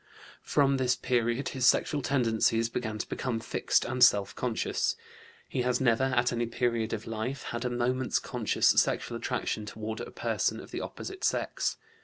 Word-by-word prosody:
From 140 Hz, -1 st, +2 dB
this 130 Hz, -1 st, +2 dB
period 120 Hz, +1 st, 0 dB
his 130 Hz, -2 st, +1 dB
sexual 145 Hz, -, +3 dB
tendencies 115 Hz, -3 st, +2 dB
began 110 Hz, -2 st, -3 dB
to 105 Hz, -, -4 dB
become 120 Hz, -4 st, -2 dB
fixed 110 Hz, -, 0 dB
and 125 Hz, -1 st, +2 dB
self 100 Hz, -5 st, +5 dB
conscious. 120 Hz, -3 st, -1 dB, 0.5 s
He 130 Hz, -, -2 dB
has 125 Hz, 0 st, +1 dB
never 125 Hz, 0 st, +3 dB
at 125 Hz, -2 st, +1 dB
any 120 Hz, 0 st, -1 dB
period 115 Hz, -2 st, -1 dB
of 110 Hz, -1 st, -4 dB
life 115 Hz, +4 st, -4 dB
had 120 Hz, +1 st, -4 dB
a -, -, +1 dB
moment's 125 Hz, +1 st, 0 dB
conscious -, -, +1 dB
sexual -, -, +2 dB
attraction 105 Hz, -1 st, -2 dB
toward 110 Hz, +1 st, -5 dB
a -, -, -6 dB
person -, -, -1 dB
of -, -, -11 dB
the -, -, -4 dB
opposite 385 Hz, -1 st, -7 dB
sex. -, -, 0 dB
120 Hz, 170 wpm, -29 LUFS, 115-130 Hz, 0.5 s, self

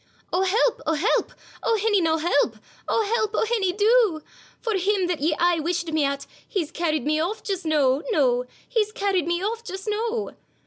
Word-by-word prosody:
'O, 360 Hz, -, +2 dB
help! 425 Hz, +5 st, +2 dB
O, 320 Hz, -, +3 dB
help! 350 Hz, +10 st, +1 dB, 0.3 s
O, 455 Hz, -, +2 dB
hinny, 415 Hz, -2 st, +2 dB
noo, 320 Hz, -1 st, +2 dB
help! 285 Hz, -8 st, +1 dB, 0.3 s
O, 450 Hz, -, +2 dB
help! 435 Hz, 0 st, 0 dB
O, -, -, +2 dB
hinny, 430 Hz, -5 st, +1 dB
do! 415 Hz, -5 st, +3 dB, 0.4 s
For 455 Hz, -2 st, -2 dB
him 385 Hz, 0 st, +1 dB
that 350 Hz, -4 st, -2 dB
ye 310 Hz, +1 st, +2 dB
aye 345 Hz, -1 st, +3 dB
wished 340 Hz, +1 st, -2 dB
me 310 Hz, -1 st, +1 dB
at, 280 Hz, 0 st, -1 dB, 0.2 s
He's 345 Hz, -7 st, -2 dB
carryin' 310 Hz, -5 st, -1 dB
me 310 Hz, +2 st, +1 dB
off 360 Hz, +7 st, -2 dB
just 385 Hz, -4 st, -3 dB
noo, 285 Hz, -3 st, +2 dB
noo; 250 Hz, -, +2 dB, 0.2 s
He's 430 Hz, -3 st, 0 dB
carryin' 390 Hz, -6 st, 0 dB
me 345 Hz, +1 st, 0 dB
off 455 Hz, +3 st, -2 dB
just 385 Hz, -1 st, -7 dB
noo. 445 Hz, +1 st, -1 dB
365 Hz, 190 wpm, -24 LUFS, 315-430 Hz, 0.4 s, O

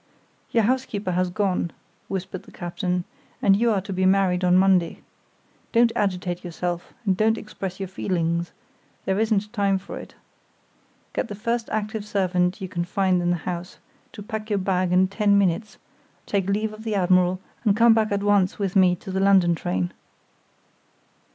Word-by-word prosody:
"Your 230 Hz, -, +2 dB
housekeeper 215 Hz, -5 st, -1 dB
has 180 Hz, +1 st, +1 dB
gone," 185 Hz, -2 st, 0 dB, 0.4 s
whispered 190 Hz, -1 st, -4 dB
the -, -, -17 dB
captain, 180 Hz, +1 st, -2 dB, 0.4 s
"and 195 Hz, -, +4 dB
you 235 Hz, +3 st, +2 dB
are 205 Hz, -4 st, +1 dB
to 195 Hz, +1 st, -6 dB
be 185 Hz, 0 st, 0 dB
married 190 Hz, -2 st, +2 dB
on 180 Hz, 0 st, +5 dB
Monday. 185 Hz, -3 st, +2 dB, 0.7 s
Don't 235 Hz, 0 st, +5 dB
agitate 180 Hz, -3 st, -1 dB
yourself, 175 Hz, 0 st, -4 dB
and 190 Hz, -2 st, +2 dB
don't 220 Hz, +3 st, +2 dB
express 195 Hz, -3 st, -6 dB
your 195 Hz, -, -3 dB
feelings—there 175 Hz, +1 st, -3 dB
isn't 215 Hz, -1 st, 0 dB
time 200 Hz, -3 st, +2 dB
for 190 Hz, -, -8 dB
it. -, -, -12 dB, 1.0 s
Get -, -, -1 dB
the 205 Hz, -, -6 dB
first 230 Hz, +2 st, -2 dB
active 215 Hz, 0 st, -2 dB
servant 185 Hz, -2 st, 0 dB
you 190 Hz, -, -3 dB
can 175 Hz, -1 st, -2 dB
find 185 Hz, 0 st, +1 dB
in 175 Hz, -, 0 dB
the 175 Hz, -, +2 dB
house 180 Hz, 0 st, -5 dB, 0.4 s
to 205 Hz, -, -8 dB
pack 220 Hz, 0 st, -5 dB
your 205 Hz, -, +1 dB
bag 185 Hz, -2 st, 0 dB
in 185 Hz, +1 st, +4 dB
ten 200 Hz, +1 st, +2 dB
minutes, 200 Hz, +2 st, 0 dB, 0.5 s
take 195 Hz, -2 st, -1 dB
leave 215 Hz, +2 st, 0 dB
of 215 Hz, +1 st, -10 dB
the 220 Hz, -2 st, -2 dB
admiral, 185 Hz, -1 st, +3 dB, 0.2 s
and 210 Hz, -3 st, +3 dB
come 230 Hz, 0 st, +7 dB
back 220 Hz, -1 st, +1 dB
at 200 Hz, 0 st, 0 dB
once 205 Hz, -3 st, +2 dB
with 195 Hz, -2 st, -2 dB
me 185 Hz, -2 st, +5 dB
to 190 Hz, -, -9 dB
the 190 Hz, -, -1 dB
London 190 Hz, -3 st, +5 dB
train." 90 Hz, -, -2 dB
195 Hz, 170 wpm, -24 LUFS, 180-210 Hz, 1.0 s, come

